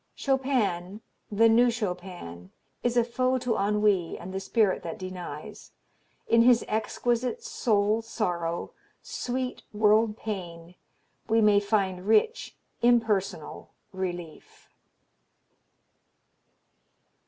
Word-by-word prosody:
Chopin, 220 -9 -1 0.3
the 225 +2 +5
New 235 +2 +5
Chopin, 180 - -5 0.3
is 240 0 0
a 240 - +5
foe 255 +2 0
to 250 -2 -1
ennui 200 -3 +1
and 185 +2 -8
the 190 - -2
spirit 205 -1 +1
that 165 - -6
denies; 180 -5 -8 0.5
in 230 - +5
his 240 0 +5
exquisite 240 - -1
soul 215 - +1
sorrow, 175 -7 -3 0.3
sweet 255 0 -4
world 215 +1 +3
pain, 175 -6 -6 0.6
we 225 +1 +4
may 210 -2 +5
find 195 -2 -1
rich 225 - +2 0.2
impersonal 220 -9 0 0.2
relief. 175 -4 -7
210 Hz, 95 wpm, -27 LUFS, 185-235 Hz, 0.6 s, the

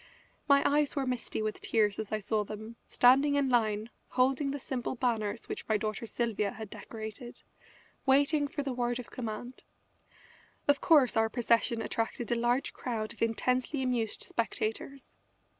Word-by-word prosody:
My 280 0 +6
eyes 295 +1 +2
were 275 -2 0
misty 250 -3 -2
with 215 0 -3
tears 210 -3 +1
as 220 - -4
I 215 - +1
saw 215 0 0
them, 215 +2 -8
standing 275 +4 +5
in 280 -2 +2
line, 220 -2 +1 0.2
holding 265 +2 +2
the 280 - -2
simple 260 -2 -3
banners 230 -3 -1
which - - -6
my 215 - +4
daughter 215 +2 -3
Sylvia 215 -4 -1
had 220 -1 -8
decorated, 220 +2 -8 0.6
waiting 285 +2 +4
for 290 -1 -4
the 270 -2 -2
word 240 -1 -1
of 250 - -8
command. 240 +1 -6 1.1
Of 285 -1 +3
course 290 -7 +5
our 225 0 +3
procession 230 -1 +1
attracted 225 +2 -2
a - - +3
large 240 +3 +1
crowd 220 -3 -3
of - - -19
intensely 250 +4 +1
amused 240 -4 0
spectators. 230 +4 -3
240 Hz, 160 wpm, -31 LUFS, 220-265 Hz, 1.1 s, My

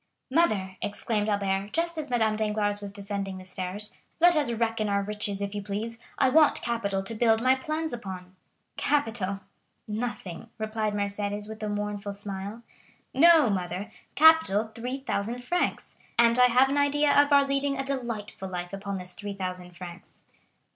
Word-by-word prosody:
"Mother," 205 - +1
exclaimed 210 +1 -1
Albert, 200 0 -1
just 340 +1 0
as 305 -3 -5
Madame 220 -3 +2
Danglars 210 -1 -1
was 200 -1 -5
descending 200 -1 -4
the 185 - -10
stairs, 185 +3 -3 0.3
"let 350 +1 +7
us 290 -6 +2
reckon 225 -2 0
our 200 0 +1
riches, 205 -1 -3
if 200 0 -4
you 205 - -3
please; 215 +3 -4 0.2
I 270 - +4
want 310 +2 +4
capital 200 -5 -1
to 195 - -5
build 225 0 +3
my 255 +3 +4
plans 310 +3 -3
upon." 190 -5 -7 0.4
"Capital—nothing!" 215 - -3
replied 215 -1 -2
Mercédès 205 0 -2
with 220 0 -9
a 215 - -2
mournful 205 0 -3
smile. 200 +2 -6 0.5
"No, 315 -4 +6
mother,—capital 210 - +2
3,000 240 -2 -3
francs. 330 +9 -2 0.2
And 235 +1 +5
I 250 - +8
have 250 +2 +5
an 280 - 0
idea 285 +1 +3
of 285 +1 +5
our 280 -1 +6
leading 275 0 0
a 270 - -2
delightful 230 -7 -4
life 180 0 -5
upon 195 0 -4
this 180 -1 -8
3,000 185 -3 -5
francs." 175 -1 -11
215 Hz, 155 wpm, -27 LUFS, 200-250 Hz, 0.5 s, I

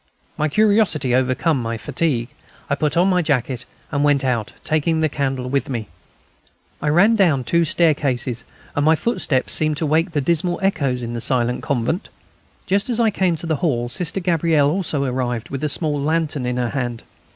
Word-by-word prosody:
My 155 +1 0
curiosity 200 - +2
overcame 130 +3 +1
my 115 0 -3
fatigue. 135 -2 -1 0.4
I - - +4
put 150 +2 0
on 180 +2 +4
my 180 -2 +3
jacket 130 -5 -1 0.3
and 145 -1 0
went 145 -2 +3
out, 120 -4 -1
taking 160 +1 +1
the 160 -1 +2
candle 135 -3 -2
with 140 +2 -1
me. 115 -5 -4 0.9
I - - -2
ran 195 +9 +5
down 170 -10 +3
the - - -10
two 170 +6 +2
staircases, 140 -8 +1 0.3
and 145 - +1
my 160 +2 +5
footsteps 155 - +1
seemed 155 -1 +1
to 160 - -1
wake 160 +4 +2
dismal 170 +3 0
echoes 135 -10 0
in 120 0 -4
the 120 - -3
silent 125 -1 0
convent. 140 - -2 0.6
Just 200 +5 0
as 240 -1 0
I 225 -2 +3
came 185 -4 +1
to 165 - -4
the 160 -2 0
hall 120 -7 -1
Sister 175 +8 -1
Gabrielle 165 -5 +2
also 160 -5 -1
arrived, 125 -3 -2
with 135 +1 -4
a 150 - +1
small 145 -1 -1
lantern 150 -3 -1
in 125 0 -1
her 120 -1 0
hand. 120 -4 -3
145 Hz, 185 wpm, -20 LUFS, 125-165 Hz, 0.9 s, ran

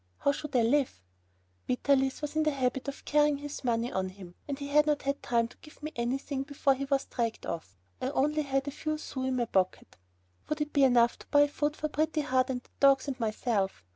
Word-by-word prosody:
How 280 - +2
should 295 0 -6
I 240 - +5
live? 260 - +2 0.7
Vitalis 270 +2 +1
was 295 - -3
in 310 - +3
the 310 - +3
habit 265 -1 -1
of 280 - -6
carrying 295 -1 +3
his 290 0 -7
money 235 -1 0
on 190 0 -1
him, 185 -2 -12
and 280 -2 -3
he 280 0 -5
had 300 +1 +4
not 295 -1 +1
had 280 +1 -1
time 235 -1 +1
to - - -18
give 300 -1 -17
me 305 - -4
anything 265 +3 -2
before 275 0 +1
he 275 +1 -3
was 275 -1 +1
dragged 230 -2 -3
off. 130 - -6 0.2
I - - -1
had 265 - -2
only 300 +3 +2
a 270 0 +2
few 300 +3 -3
sous 260 -3 -4
in 260 - 0
my 245 -1 +1
pocket. 190 -4 -1 0.5
Would 305 - -1
it 300 0 -2
be 280 -2 +5
enough 240 -2 +4
to - - -14
buy 290 0 +5
food 295 +1 -1
for 305 - -1
Pretty 310 +1 0
Heart, 260 -3 +2
the 255 -2 -3 0.2
dogs, 275 0 +5
and 265 -2 -3
myself? 215 - -1
275 Hz, 230 wpm, -30 LUFS, 245-290 Hz, 0.7 s, I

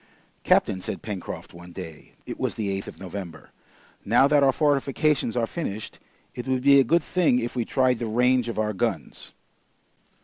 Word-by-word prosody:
"Captain," 95 - +2
said - - -5
Pencroft 100 -5 -6
one 85 +1 -12
day, 80 -2 -10
it - - -7
was - - -1
the 105 -3 -2
8th - - -13
of - - -10
November, 90 -3 -8 0.5
"now 120 +6 +4
that 145 0 +4
our 135 -1 +5
fortifications 140 -2 +1
are 115 - +2
finished, 110 - -6 0.3
it 125 - -7
would 130 -1 0
be 140 0 +7
a - - +6
good 165 +6 +2
thing 170 -8 +2
if 120 0 -3
we 120 -2 -1
tried 130 -2 +1
the 120 - -3
range 125 +2 +2
of 115 - -5
our 105 0 0
guns." 95 - -3
120 Hz, 180 wpm, -25 LUFS, 105-135 Hz, 0.5 s, be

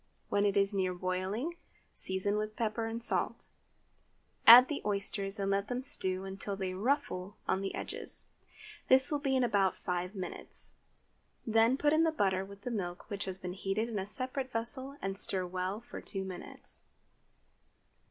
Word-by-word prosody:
When 205 0 +2
it 200 0 0
is 195 +1 +3
near 185 -2 0
boiling, 190 - -3 0.4
season 190 +2 0
with 215 0 -3
pepper 225 0 -1
and 225 +1 -4
salt; - - 0 1.0
add 245 +3 +12
the 295 - -3
oysters, 200 0 -1
and 195 0 0
let 200 +1 0
them 250 +2 -3
stew 190 -10 +1
until 195 +1 -3
they 190 -1 -3
"ruffle" 200 -3 -1
on 190 - +1
the 195 - -3
edge. - - -5 0.9
This 260 +2 +6
will 295 - 0
be 275 -2 0
in 260 - +3
about 200 -5 +2
five 180 +2 -3
minutes. 185 -2 -4 0.7
Then 225 +3 +3
put 295 +1 +2
in 315 - +4
the 325 -1 +3
butter 195 -10 +1
with 200 +1 -12
the 245 - -4
milk 180 -2 -5
which 200 0 -3
has 190 -1 -2
been 180 -1 -6
heated 200 +4 -2
in 215 -3 -2
a 190 - -4
separate 255 +4 -2
vessel, 260 +5 -4
and 195 0 -2
stir 185 -3 +5
well 185 +4 -3
for 240 - -9
two 195 -1 -3
minutes. 185 -2 -10
200 Hz, 170 wpm, -32 LUFS, 190-240 Hz, 1.0 s, add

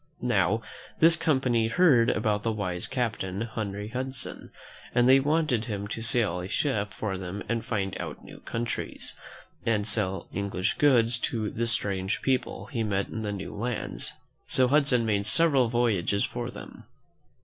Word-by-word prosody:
Now, 110 -2 +2 0.4
this 165 +1 +7
company 130 -8 +1
heard 120 -4 +4
about 105 -2 0
the 115 - 0
wise 95 -5 -2
captain, 110 -6 -2
Henry 105 -3 -4
Hudson, 130 +2 -5 0.5
and 120 0 +4
they 135 +1 +7
wanted 145 -5 +1
him 100 -3 -4
to 115 - -4
sail 110 -6 +3
a 90 - -5
ship 105 -3 -1
for 95 -3 -4
them 95 +2 -5
and 115 -1 -1
find 95 -2 -2
out - - -7
new - - -12
countries, 115 +1 -4 0.5
and 105 -2 0
sell 95 -5 +1
English 100 -1 -2
goods 120 -5 +4
to 110 -3 -2
the 115 +1 -1
strange 100 -3 -1
people 130 -1 -1
he 115 - -3
met 100 -3 -1
in 110 - -5
the 105 -1 -2
new 100 -1 -6
lands; 115 +2 -3 0.3
so 130 -1 +4
Hudson 140 -5 +4
made 105 -2 0
several 140 -8 +4
voyages 105 -5 +1
for 120 0 -5
them. - - -11
115 Hz, 160 wpm, -27 LUFS, 100-125 Hz, 0.5 s, this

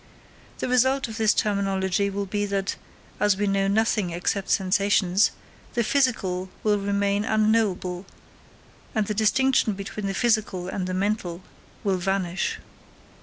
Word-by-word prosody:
The - - -3
result 260 +2 +2
of 225 -1 -7
this 220 -2 +4
terminology 195 -2 0
will 200 0 -3
be 205 +1 -2
that, 195 -1 -1 0.4
as 205 -2 +3
we 205 - 0
know 195 -1 +1
nothing 210 -2 +1
except 180 +3 -2
sensations, 195 0 +3 0.5
the 235 - +2
physical 205 -8 0
will 210 -1 +2
remain 200 0 0
unknowable, 210 -4 +1 0.9
and 215 -1 +2
the 210 - -2
distinction 220 +2 +2
between 200 +1 -5
the 195 - -2
physical 215 -6 +1
and 185 -1 -3
the 185 - -2
mental 190 -3 -2 0.4
will 195 -3 +1
vanish. 185 -1 -1
200 Hz, 135 wpm, -25 LUFS, 190-215 Hz, 0.9 s, this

